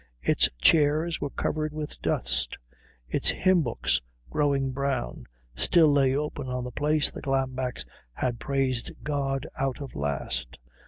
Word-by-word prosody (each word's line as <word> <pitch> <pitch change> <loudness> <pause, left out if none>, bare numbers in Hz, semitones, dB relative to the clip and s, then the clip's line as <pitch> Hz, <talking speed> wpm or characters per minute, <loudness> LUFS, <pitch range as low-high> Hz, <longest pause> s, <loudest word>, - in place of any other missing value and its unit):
Its - - +5
chairs 155 - +4
were 145 - -1
covered 155 +2 -2
with 150 -1 -5
dust; - - -1 0.5
its - - +2
hymn 185 -2 +3
books, 120 - 0 0.3
growing 140 - +1
brown, 135 - -2 0.3
still 155 - +5
lay 135 -2 +4
open 145 -2 -3
at 125 0 -2
the 125 - -5
place 150 +2 +1
the - - -8
Glambecks 130 -2 -1 0.3
had 120 - -2
praised 135 -3 -1
God 140 -2 -1
out 135 0 -1
of 140 -2 -7
last. 70 -4 -3
135 Hz, 140 wpm, -27 LUFS, 125-150 Hz, 0.5 s, Its